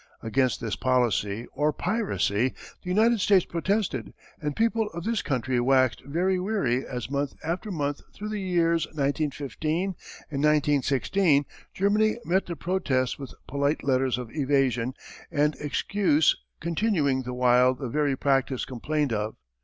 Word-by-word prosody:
_] -, -, -5 dB
Against 130 Hz, +2 st, +1 dB
this 110 Hz, -4 st, -3 dB
policy 120 Hz, -4 st, +1 dB
or 150 Hz, +1 st, +1 dB
piracy 130 Hz, -, 0 dB, 0.3 s
the 180 Hz, -, -7 dB
United 220 Hz, +3 st, +3 dB
States 190 Hz, -3 st, +4 dB
protested, 175 Hz, -, -1 dB, 0.3 s
and 150 Hz, -1 st, -2 dB
people 225 Hz, -1 st, +1 dB
of 170 Hz, -, -4 dB
this 225 Hz, 0 st, 0 dB
country 130 Hz, -2 st, -1 dB
waxed 130 Hz, 0 st, +3 dB
very 180 Hz, +7 st, 0 dB
weary 180 Hz, -, 0 dB
as 125 Hz, -2 st, -6 dB
month 140 Hz, 0 st, -1 dB
after 175 Hz, +7 st, -3 dB
month 145 Hz, -6 st, -2 dB
through 210 Hz, +1 st, -6 dB
the 210 Hz, -1 st, -3 dB
years 170 Hz, -3 st, +1 dB
1915 155 Hz, +4 st, -2 dB, 0.4 s
and 140 Hz, 0 st, -2 dB
1916 145 Hz, +2 st, +3 dB, 0.3 s
Germany 210 Hz, +3 st, +2 dB
met 190 Hz, +3 st, +1 dB
the 170 Hz, -, -4 dB
protests 150 Hz, -10 st, -1 dB
with 135 Hz, -2 st, -8 dB
polite 140 Hz, +2 st, 0 dB
letters 130 Hz, -2 st, +1 dB
of 125 Hz, -3 st, -6 dB
evasion 130 Hz, -4 st, +1 dB, 0.3 s
and 150 Hz, +1 st, +2 dB
excuse 155 Hz, +1 st, +2 dB, 0.2 s
continuing 165 Hz, -6 st, +1 dB
the 125 Hz, 0 st, -5 dB
while 125 Hz, +1 st, +4 dB
the 130 Hz, 0 st, -5 dB
very 145 Hz, +2 st, +1 dB
practice 135 Hz, -2 st, +1 dB
complained 140 Hz, +1 st, -1 dB
of. 105 Hz, 0 st, -2 dB
145 Hz, 145 wpm, -26 LUFS, 130-180 Hz, 0.4 s, States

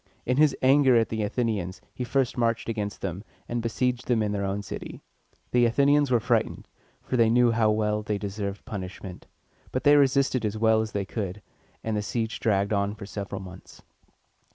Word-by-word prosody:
In 125 Hz, +1 st, +1 dB
his 150 Hz, -2 st, +4 dB
anger 135 Hz, -1 st, +5 dB
at 115 Hz, -1 st, +3 dB
the 110 Hz, -1 st, -2 dB
Athenians, 105 Hz, -4 st, -2 dB
he 125 Hz, -, -4 dB
first 130 Hz, +1 st, 0 dB
marched 115 Hz, -1 st, 0 dB
against 105 Hz, -3 st, -3 dB
them, 95 Hz, +1 st, -4 dB, 0.2 s
and 120 Hz, 0 st, -2 dB
besieged 125 Hz, +2 st, -1 dB
them 115 Hz, -3 st, +2 dB
in 105 Hz, -, -1 dB
their 100 Hz, -1 st, -2 dB
own 100 Hz, +1 st, -2 dB
city. -, -, -7 dB, 0.5 s
The 120 Hz, -1 st, +4 dB
Athenians 140 Hz, +4 st, +3 dB
were 120 Hz, -2 st, +3 dB
frightened, 110 Hz, -, 0 dB, 0.4 s
for 130 Hz, -, -2 dB
they 115 Hz, -2 st, +5 dB
knew 120 Hz, +1 st, +4 dB
how 115 Hz, -1 st, +3 dB
well 105 Hz, 0 st, +1 dB
they 105 Hz, -1 st, -2 dB
deserved 100 Hz, 0 st, -5 dB
punishment; 95 Hz, -2 st, -7 dB, 0.4 s
but 130 Hz, -, -2 dB
they 145 Hz, 0 st, +6 dB
resisted 135 Hz, -3 st, +3 dB
as 105 Hz, 0 st, -1 dB
well 110 Hz, 0 st, +3 dB
as 110 Hz, -1 st, -5 dB
they 100 Hz, -1 st, -1 dB
could, 100 Hz, -1 st, -5 dB, 0.4 s
and 110 Hz, -1 st, -1 dB
the 105 Hz, -, 0 dB
siege 110 Hz, +1 st, -3 dB
dragged 100 Hz, -1 st, +1 dB
on 100 Hz, 0 st, 0 dB
for 105 Hz, -2 st, -9 dB
several 100 Hz, -1 st, -5 dB
months. 90 Hz, -1 st, -12 dB
110 Hz, 190 wpm, -26 LUFS, 100-125 Hz, 0.5 s, they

